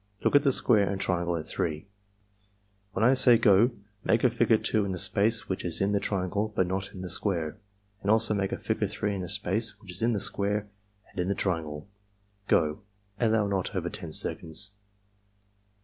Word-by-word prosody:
Look - - +2
at 145 - +7
the 140 -2 +3
square 110 -5 +4
and 100 -1 -3
triangle 85 -2 -1
at 80 - -6
3. 80 +1 -3 1.1
When 110 - +1
I 130 - +6
say 125 -2 +6
'go' 110 +1 +5 0.3
make 115 - +2
a 125 - +4
figure 115 -1 +3
2 110 0 0
in 100 -1 -3
the - - -4
space 100 +4 +1
which 95 - -3
is 85 -2 -2
in 100 +1 +1
the 100 - +2
triangle 100 +2 -2
but 95 - +2
not 95 +2 -4
in 95 - -8
the - - -5
square, 85 -1 -1 0.4
and 100 - -3
also 110 0 +5
make 100 -2 -1
a - - -2
figure - - -1
3 105 -1 -3
in 95 - -4
the 90 - -6
space 105 +2 -1
which 100 -4 -11
is 90 - -6
in 115 +1 +2
the 105 - -1
square 105 +1 0 0.4
and - - -9
in 90 - 0
the 100 - 0
triangle. 80 -4 -3 0.3
— 100 0 -41
Go!" 80 +5 +1 0.4
(Allow 110 -3 +2
not 95 -2 -2
over - - -2
10 - - -7
seconds.) 95 +5 0
100 Hz, 205 wpm, -28 LUFS, 90-110 Hz, 1.1 s, at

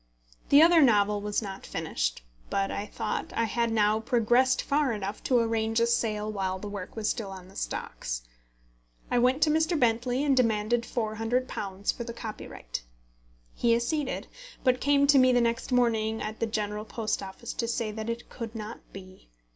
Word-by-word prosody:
The 285 +2 +8
other 335 -1 +6
novel 210 -5 +4
was 210 +2 -1
not 195 -2 -7
finished; - - -2 0.3
but 195 0 0
I 205 - -3
thought 210 +1 -3
I 230 - +2
had 230 +1 0
now 215 -1 +3
progressed 240 +2 +2
far 285 -2 +1
enough 205 0 -5
to 255 - +3
arrange 225 -1 +1
a 230 - +4
sale 215 -2 0
while 190 -2 -2
the 205 - -7
work 200 -2 -7
was 220 -2 -2
still 220 -5 -2
on 190 -1 -10
the 195 - -17
stocks. - - -4 0.9
I 245 - +3
went 255 +4 +3
to 305 - +4
Mr. 320 +1 +2
Bentley 245 +2 +1
and 280 -2 +3
demanded 230 -1 +2
£400, 220 -3 -2
for 235 - -5
the 235 0 -6
copyright. 215 - -7 0.7
He 235 -1 +3
acceded, 265 +4 -1 0.4
but 255 -1 +2
came 280 0 +4
to 280 -1 +6
me 255 0 +5
the 245 - +4
next 235 +1 0
morning 225 -3 +2
at 215 +1 -5
the 230 - 0
General 210 -1 -3
Post 220 -1 -2
Office 195 +4 -7
to 230 - -2
say 230 -2 -1
that 220 +1 -5
it 230 +1 -4
could 230 -2 -7
not 220 +1 -6
be. 185 - -12
225 Hz, 180 wpm, -28 LUFS, 210-245 Hz, 0.9 s, The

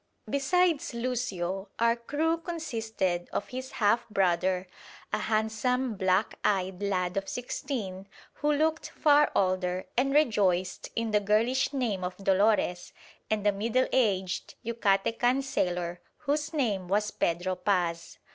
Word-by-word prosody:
Besides 295 0 +1
Lucio 205 -6 -2
our 230 0 +3
crew 305 +7 -1
consisted 225 - -2
of - - -3
his 260 +1 -6
half 230 +2 +2
brother, 185 -2 +1 0.5
a - - +1
handsome 220 +3 0
black 190 +1 +1
eyed 190 -1 0
lad 185 -2 -1
of 195 0 -2
sixteen, 225 -6 -4 0.3
who 295 0 +3
looked 315 +2 +1
far 295 -1 +4
older 185 -1 +1
and 270 +3 +2
rejoiced 200 -11 +2
in 230 -1 -1
the 210 - +4
girlish 225 +7 +2
name 235 -9 -1
of 180 0 -4
Dolores, 195 -2 +1 0.4
and 215 -1 0
a 205 - +5
middle 230 +6 +1
aged 195 -7 0
Yucatecan 235 +4 +1
sailor 175 -8 -2 0.2
whose 295 0 -1
name 215 - 0
was 210 +3 +1
Pedro 175 +2 0
Paz. 175 -3 -1
215 Hz, 130 wpm, -29 LUFS, 185-255 Hz, 0.5 s, a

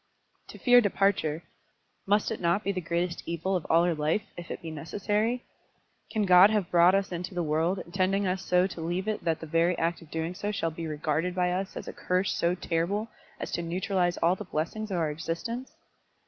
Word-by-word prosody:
"To - - -11
fear 245 -1 +6
departure; 195 -6 +1 0.6
must 205 +2 +2
it 220 - -3
not 175 +4 +1
be 200 - 0
the 185 -2 -3
greatest 170 +1 -2
evil 170 +3 -1
of 175 - -2
all 165 +1 +5
our 175 - +2
life, 155 +6 0
if 175 -1 -9
it - - -5
be 165 - -5
necessary? 210 +9 -1 0.6
Can 215 -2 0
God 185 +1 +8
have 210 -5 0
brought 175 +2 +6
us 195 -1 0
into 180 +1 -5
the 175 - 0
world, 160 +4 +1
intending 190 +2 0
us 185 0 -1
so 180 0 +3
to 180 -3 -5
leave 175 +4 -2
it 215 -1 -2
that 165 -2 0
the - - -5
very 165 +2 +2
act 170 +1 -1
of 165 - -15
doing 165 +2 -3
so 205 +3 -3
shall 165 -5 -1
be 165 +1 -5
regarded 155 +3 -1
by 180 -1 +1
us 190 +2 -3
as - - -7
a - - -5
curse 185 +1 0
so 170 +1 +1
terrible 185 +6 -1 0.3
as - - -5
to - - -1
neutralise 175 +1 0
all 170 +2 +5
the - - -7
blessings 215 +8 -3
of 190 - -1
our 160 -3 0
existence? 170 - -4
180 Hz, 215 wpm, -28 LUFS, 165-195 Hz, 0.6 s, God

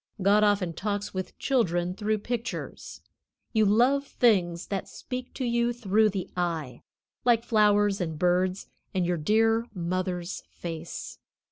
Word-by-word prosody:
God 200 +2 +4
often 200 -5 +2
talks 205 +3 -3
with 185 -1 -5
children 180 -9 +1
through 215 +2 0
pictures. 240 +3 -5 0.5
You 220 -2 +4
love 255 +7 +3
things 185 -7 +2
that 195 -2 -2
speak 250 -1 -6
to 260 - -2
you 235 0 +1
through 220 -2 +2
the 195 -3 -3
eye, 165 -7 -2 0.4
like 235 -2 +4
flowers 205 -3 +3
and 160 -3 -3
birds, 180 +3 +1 0.3
and 185 -2 +2
your 175 0 0
dear 225 +7 +2
mother's 180 0 -2
face. 165 -1 -7
200 Hz, 135 wpm, -27 LUFS, 180-225 Hz, 0.5 s, God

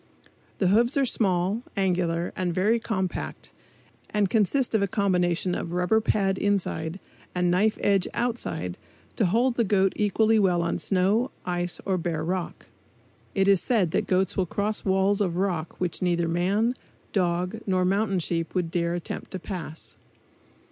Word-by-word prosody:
The 185 - +2
hoofs 235 +7 +3
are 275 - +3
small, 195 -2 +1 0.2
angular 175 -3 0
and 180 -2 -2
very 215 +5 +2
compact 190 -5 -4 0.6
and 205 -3 0
consist 235 +5 +2
of 220 - +3
a 200 - +2
combination 180 -2 +1
of 170 - -4
rubber 180 +5 +2
pad 195 -3 +1
inside 190 -4 -1 0.4
and 180 -1 +2
knife 210 +5 +2
edge 195 -2 +2
outside 235 - -2 0.4
to - - +2
hold 235 +6 +2
the 235 - +3
goat 195 -2 +2
equally 215 +2 +3
well 180 -4 +2
on 170 - -1
snow, 200 +6 +1 0.2
ice 175 0 -2
or 190 -2 0
bare 165 -2 -2
rock. 180 +1 -3 0.7
It 195 -1 +2
is 195 -3 +5
said 205 -9 +1
that - - 0
goats 185 0 +1
will 185 -2 0
cross 210 +4 -2
walls 195 +1 +2
of 175 -4 0
rock 180 -4 -2
which 180 -2 -2
neither 175 -2 +1
man, 195 +8 +1 0.4
dog 180 +2 0
nor 185 -1 +2
mountain 195 +1 +1
sheep 165 0 -2
would 175 -3 0
dare 170 -1 0
attempt 175 - -6
to 185 - -3
pass. 170 -4 -7
190 Hz, 160 wpm, -26 LUFS, 175-205 Hz, 0.7 s, is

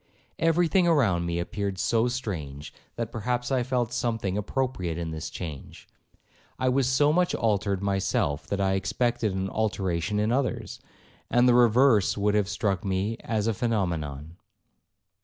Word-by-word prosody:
Every 165 +1 +3
thing 180 +1 +3
around 100 - +2
appeared 95 +3 -3
so 115 +4 +2
strange, 85 - -5 0.2
that 115 -1 -4
perhaps 120 +3 -2
I 130 -2 +2
felt 120 -1 -1
something 115 -6 -1
appropriate 105 -6 -2
in 85 -1 -4
this 80 -1 -5
change. 80 -6 -8 0.7
I 130 - +1
was 130 0 +2
so 145 +3 +3
much 180 +1 +2
altered 100 -3 0
myself, 95 -7 0
that 100 - -2
I 95 -1 +2
expected 110 +3 0
an 95 0 -1
alteration 95 -2 -1
in 105 +2 +1
others, 130 +1 -2 0.5
and 120 +1 +4
the 125 - +6
reverse 120 -3 +4
would 105 0 +1
have 105 -2 +1
struck 100 -3 -1
me 100 +3 -1
as 110 -3 -2
a 115 - +1
phenomenon. 85 - -2
105 Hz, 150 wpm, -26 LUFS, 95-125 Hz, 0.7 s, the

